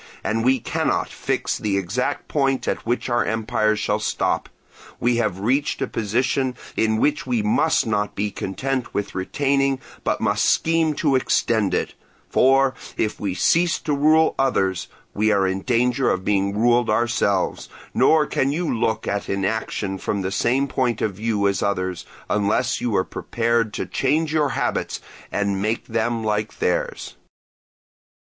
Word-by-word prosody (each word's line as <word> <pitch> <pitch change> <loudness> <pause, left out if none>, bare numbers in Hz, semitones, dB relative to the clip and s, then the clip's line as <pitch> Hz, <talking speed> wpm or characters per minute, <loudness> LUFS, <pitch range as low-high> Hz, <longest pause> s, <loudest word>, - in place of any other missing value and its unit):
And 115 +1 0
we 130 +1 +3
cannot - - -1
fix - - -2
the 100 -2 0
exact 105 +9 -2
point 135 -3 0
at - - -2
which 120 +1 0
our 120 -1 +2
empire 110 -1 0
shall - - -1
stop; - - -1 0.5
we 120 0 +2
have 105 -5 0
reached 135 +7 +1
a - - 0
position 125 +4 -1 0.2
in 110 0 +1
which 150 +6 +1
we 240 -3 0
must 215 -7 +2
not 105 -2 -1
be 105 0 -1
content 130 +7 -3
with 100 - -2
retaining 135 +7 0 0.2
but - - 0
must - - +1
scheme 165 -2 +2
to 135 - +1
extend 110 -6 +1
it, - - -2 0.4
for, 135 0 +4 0.2
if 110 - -1
we 100 -3 -2
cease 170 - +3
to 150 - -1
rule 155 +3 +4
others, 95 -9 +1 0.3
we 110 +1 +2
are 100 -2 +3
in 95 +1 -1
danger 125 +1 +1
of 95 0 -1
being 100 0 +1
ruled 120 +1 +3
ourselves. 110 -4 0 0.2
Nor 155 -1 +4
can 135 -1 0
you 160 -2 -1
look 110 -1 -1
at 100 0 -2
inaction 100 0 -2
from 100 0 -2
the 95 - -2
same 130 +7 +1
point 125 -5 -1
of 105 - 0
view 105 0 0
as 100 - 0
others, 95 -3 -2 0.2
unless 105 +5 +1
you 120 -4 -1
are 95 - +3
prepared 115 +2 -1
to - - -2
change 150 +3 0
your 150 -3 +2
habits 135 -2 -2 0.3
and 100 -1 -1
make 110 +3 -1
them 115 0 -1
like 105 0 -1
theirs. - - -2
115 Hz, 160 wpm, -22 LUFS, 100-135 Hz, 0.5 s, for